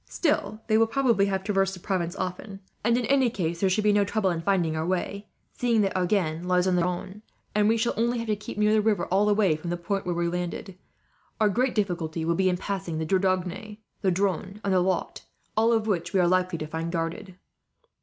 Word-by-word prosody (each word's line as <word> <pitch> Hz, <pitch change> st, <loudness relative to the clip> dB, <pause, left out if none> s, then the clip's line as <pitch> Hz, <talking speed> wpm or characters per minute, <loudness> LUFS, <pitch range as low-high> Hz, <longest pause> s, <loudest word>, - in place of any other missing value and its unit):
Still, 215 Hz, -, -1 dB
they 220 Hz, -1 st, +3 dB
will 225 Hz, -, +4 dB
probably 230 Hz, -5 st, +2 dB
have 190 Hz, -1 st, -1 dB
traversed 195 Hz, -2 st, +1 dB
the -, -, -11 dB
province 175 Hz, -2 st, -2 dB
often; 195 Hz, +2 st, -5 dB, 0.2 s
and 235 Hz, +2 st, +3 dB
in 245 Hz, -, -1 dB
any 265 Hz, 0 st, +3 dB
case 170 Hz, -6 st, -3 dB
there 195 Hz, -, +2 dB
should 210 Hz, +3 st, +1 dB
be 210 Hz, 0 st, +4 dB
no 205 Hz, 0 st, +4 dB
trouble 200 Hz, -1 st, 0 dB
in 165 Hz, -1 st, -2 dB
finding 170 Hz, -3 st, +1 dB
our 160 Hz, -, -1 dB
way, 185 Hz, +3 st, -2 dB, 0.3 s
seeing 235 Hz, -3 st, +1 dB
that 195 Hz, -2 st, 0 dB
Agen 180 Hz, -3 st, 0 dB
lies 180 Hz, 0 st, +3 dB
on 185 Hz, -1 st, +2 dB
the 175 Hz, -, +2 dB
Garonne, 180 Hz, +3 st, -3 dB, 0.3 s
and 210 Hz, 0 st, +3 dB
we 225 Hz, -, +3 dB
shall 230 Hz, +1 st, 0 dB
only 235 Hz, +2 st, +1 dB
have 230 Hz, -, -3 dB
to 215 Hz, -1 st, 0 dB
keep 210 Hz, 0 st, -8 dB
near 210 Hz, 0 st, +3 dB
the 215 Hz, -, +4 dB
river, 210 Hz, -4 st, +1 dB
all 200 Hz, +3 st, +3 dB
the 205 Hz, -, +3 dB
way 195 Hz, -7 st, +3 dB
from 155 Hz, +3 st, -6 dB
the 175 Hz, -, -1 dB
point 185 Hz, +2 st, -3 dB
where 175 Hz, -, 0 dB
we 170 Hz, 0 st, 0 dB
are 170 Hz, -, -1 dB
landed. 180 Hz, +2 st, -4 dB, 0.6 s
Our 215 Hz, -1 st, +4 dB
great 245 Hz, +5 st, 0 dB
difficulty 170 Hz, -6 st, -1 dB
will 170 Hz, -, +2 dB
be 185 Hz, +2 st, +2 dB
in 180 Hz, -, 0 dB
crossing 190 Hz, -3 st, -4 dB
the 160 Hz, -, -2 dB
Dordogne, 185 Hz, +3 st, -1 dB, 0.2 s
the 195 Hz, -, +2 dB
Dronne, 190 Hz, +1 st, -1 dB
and 195 Hz, -, +1 dB
the 185 Hz, -, +4 dB
Lot, 180 Hz, -1 st, -1 dB, 0.3 s
all 225 Hz, +2 st, +3 dB
of 225 Hz, -2 st, +2 dB
which 195 Hz, -3 st, -1 dB
we 195 Hz, -, +3 dB
are 175 Hz, -, +4 dB
likely 185 Hz, -1 st, +1 dB
to 155 Hz, -, -4 dB
find 160 Hz, +2 st, -4 dB
guarded." 170 Hz, +2 st, -4 dB
190 Hz, 240 wpm, -26 LUFS, 175-210 Hz, 0.6 s, will